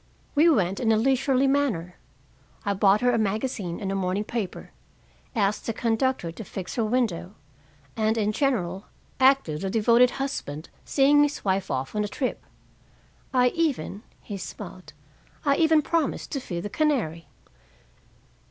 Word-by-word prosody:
We 315 +3 +5
went 195 - +2
in 225 -2 +2
a 220 - +4
leisurely 265 +2 +2
manner. 265 -12 0 0.7
I 200 - +1
bought 200 +1 +4
her 245 0 +4
a 235 - +1
magazine 210 -4 -2
and 195 -1 -3
a - - -1
morning 190 +1 -1
paper, 215 -4 -5 0.6
asked 205 -2 0
the 230 - 0
conductor 230 -5 0
to 220 - -8
fix 185 -2 -6
her 230 - 0
window, 215 -5 -1 0.6
and, 220 0 +1
in 210 -1 +1
general, 205 -8 -1 0.3
acted 260 - +3
the 195 - -2
devoted 235 +4 +4
husband 170 - -4 0.2
seeing 285 +1 +4
his 290 -4 0
wife 190 0 0
off 130 +4 -3
on 210 - +1
a - - -2
trip. 255 +5 -3 0.9
I 250 -1 +4
even" 290 - -1 0.2
he 205 - -6
smiled 185 +1 -9 0.5
"I 280 -1 +3
even 320 -2 +4
promised 325 -3 -1
to 275 - -1
feed 175 -9 -5
the 205 - -5
canary." 215 - 0
220 Hz, 150 wpm, -26 LUFS, 190-270 Hz, 0.9 s, We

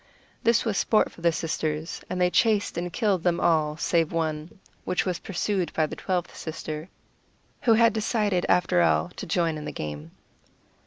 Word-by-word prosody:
This 230 +1 +3
was 215 -4 0
sport 215 - +2
for - - -15
the 170 0 +4
sisters 160 0 -3
and 180 - -3
they 180 0 +3
chased 215 -1 +2
and 175 +1 -3
killed 200 -5 +1
them 170 0 +1
all 155 -2 +2
save 165 -1 +1
one, 160 +1 -3 0.2
which 180 - 0
was 180 -3 -1
pursued 190 -2 -2
by 160 - +2
the - - -6
twelfth 180 -2 -2
sister, 155 0 -6 0.7
who 230 - +4
had 230 0 +5
decided 210 -4 0
after 180 0 +3
all 170 - +2
to 190 +2 -8
join 165 -1 0
in 150 - -7
the - - -4
game. 75 +1 -6
175 Hz, 175 wpm, -26 LUFS, 160-200 Hz, 0.7 s, had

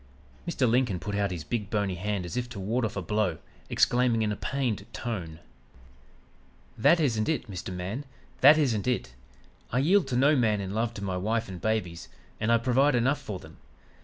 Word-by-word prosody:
"Mr. 140 -7 +1
Lincoln 115 -6 +2
put 105 - -5
out 100 0 +1
his 85 -4 -5
big 105 -1 -3
bony 100 -3 0
hand 95 +1 -2
as 90 - -6
if 125 -1 -2
to 110 - -7
ward 115 +5 0
off 110 - -4
a 100 - -2
blow, 100 -3 0 0.3
exclaiming 120 -2 +3
in 105 - 0
a - - -1
pained 120 -5 -2
tone: 90 -9 -4 1.4
"'That 170 +10 +4
isn't 115 -7 +1
it, 155 -5 -1
Mr. 95 -2 -6
Man. 95 +9 -4 0.4
That 145 +4 +8
isn't 125 -8 +1
it. 120 - -1 0.6
I 125 - 0
yield 170 +5 +3
to 130 - -2
no 145 +4 +5
man 110 -5 +2
in 95 0 -4
love 115 +2 -1
to 100 - -6
my 95 -2 -2
wife 110 +4 -1
and 90 -3 -8
babies, 90 -7 -2 0.3
and 110 +2 +1
I 115 - +6
provide 130 +4 +3
enough 135 +4 +1
for 105 -8 -5
them. 95 - -14
110 Hz, 195 wpm, -28 LUFS, 100-125 Hz, 1.4 s, That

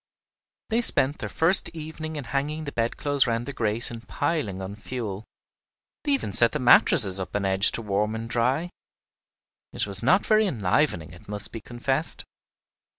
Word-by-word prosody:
They 230 +2 +1
spent 145 - +6
their - - -5
first 175 +4 +2
evening 160 0 -7
in 145 - -5
hanging 145 +5 -3
the 140 - -6
bedclothes 135 +4 0
round 115 0 -2
the 140 - -6
grate 115 0 -3
and 115 -1 -10
piling 115 - -3
on 95 +1 -7
fuel; 110 -2 -7 0.8
they 290 - 0
even 185 - -2
set 120 +3 +4
the - - -2
mattresses 120 - +5
up 95 - -7
on 100 -1 -1
edge 95 +1 +3
to 115 - -4
warm 105 +1 -1
and 115 +1 -6
dry! 130 +9 -1 1.0
It - - -2
was 100 -1 +2
not 180 - +2
very 215 -1 +3
enlivening, 100 - -1
it 90 +3 -16
must 105 -1 -3
be 115 - -8
confessed. 130 +7 -2
120 Hz, 170 wpm, -24 LUFS, 105-150 Hz, 1.0 s, spent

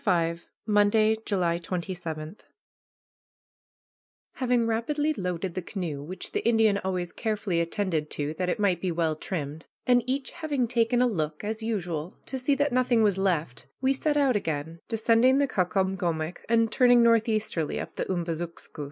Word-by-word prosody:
V 170 -3 +1 0.3
MONDAY, 215 +1 +4
JULY 175 -4 +1
27 170 -1 -5 2.0
Having 250 -2 +1
rapidly 290 +7 0
loaded 180 - -3
the 185 - -3
canoe, 170 -6 -4
which 175 +6 -6
the - - 0
Indian 225 -3 +3
always 180 -2 -3
carefully 210 -6 -1
attended 170 -3 -1
to, 145 +1 -2
that 180 +3 -2
it - - 0
might 185 -5 +2
be 185 - 0
well 165 -2 0
trimmed, 155 -2 -5 0.2
and 245 -1 +5
each 265 +1 -1
having 295 -7 -1
taken 240 +1 +2
a - - +4
look, 155 -8 -2
as 220 +2 -3
usual, 180 -7 -3
to 265 - -4
see 275 +3 +2
that 285 -1 +1
nothing 245 -3 +3
was 200 -3 +2
left, 150 -11 -1
we 265 +1 +2
set 295 +2 0
out 275 -4 +3
again, 160 -3 -3
descending 230 +3 +4
the 280 0 +3
Caucomgomoc, 180 -5 -1
and 230 -1 +3
turning 245 -2 +5
northeasterly 220 -8 +1
up - - -6
the - - -3
Umbazookskus. 170 -2 -4
195 Hz, 155 wpm, -27 LUFS, 170-235 Hz, 2.0 s, and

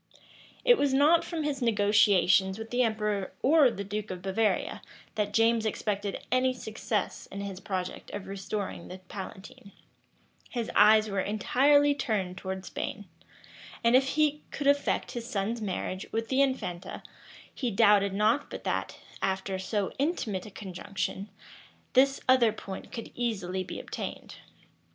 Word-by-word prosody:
It 485 -2 +6
was 280 -2 +2
not 305 +5 +5
from 330 -3 -3
his 285 -3 -2
negotiations 205 -4 +4
with 225 0 -8
the 245 +1 +2
emperor 210 -4 -1
or 295 -1 +6
the 200 -4 -5
duke 210 +1 -4
of 180 -1 -6
Bavaria, 205 +3 0 0.3
that 210 -1 -1
James 225 +1 +3
expected 205 -2 -2
any 255 0 +2
success 220 -2 -3
in 200 - -7
his 195 -2 -5
project 185 -2 -4
of 200 - -6
restoring 195 -1 -5
the 185 - -8
palatine: 190 +1 -10 0.8
his 235 -3 -3
eyes 215 +1 +6
were 200 -2 -2
entirely 275 +9 +3
turned 215 -10 -2
towards 190 0 -5
Spain; 205 - -5 0.8
and 235 +1 +5
if 265 +1 +5
he 300 -1 +2
could 290 - -5
effect 285 0 +2
his 235 -1 -6
son's 215 +3 -2
marriage 190 -1 -3
with 225 0 -2
the 265 +1 +3
infanta, 225 -10 -2 0.5
he 250 - -2
doubted 205 -2 +4
not 215 +8 +1
but - - -7
that, - - -2 0.2
after 190 0 -1
so 200 +1 -1
intimate 230 - -1
a - - -8
conjunction, 195 +1 -5 0.6
this 270 +1 +4
other 255 -3 +5
point 195 -2 -8
could 230 -3 -7
easily 190 -6 -2
be 185 - -7
obtained. - - -7
215 Hz, 145 wpm, -29 LUFS, 195-250 Hz, 0.8 s, It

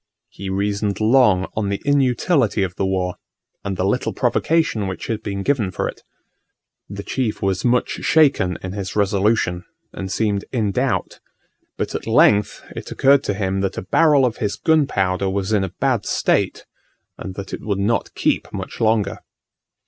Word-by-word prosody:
He 100 0 -7
reasoned 100 +1 -1
long 110 -4 +4
on 105 -2 -1
the 100 - -2
inutility 135 - +2
of 90 -2 -3
the 95 - -1
war, 90 -1 -1 0.5
and 100 -2 -3
the - - 0
little - - 0
provocation 160 -11 +1
which 95 - -5
had 110 -1 -3
been 100 -2 -4
given 120 -7 +1
for 90 - -2
it. - - -8 0.9
The 100 0 -6
chief 120 -4 -2
was 95 -1 0
much 125 0 +1
shaken 140 - +3
in 95 - -4
his 95 -2 -5
resolution, 100 -3 +1 0.3
and 95 0 -5
seemed 100 0 0
in 110 -6 0
doubt: - - -1 0.6
but - - -3
at - - -5
length 105 -1 +3
it - - -7
occurred 140 +1 +4
to 100 - -1
him 95 -1 -1
that 95 - -2
a - - -3
barrel 145 - +4
of 120 - -1
his 105 -1 -2
gunpowder 100 - +1
was 95 +2 -1
in 100 -2 +2
a 95 - -2
bad 125 +3 -1
state, - - 0 0.5
and 95 - -7
that 100 -1 -7
it - - -5
would 100 -2 -2
not 105 +4 -1
keep - - 0
much - - -7
longer. 110 -2 +1
100 Hz, 170 wpm, -21 LUFS, 95-120 Hz, 0.9 s, long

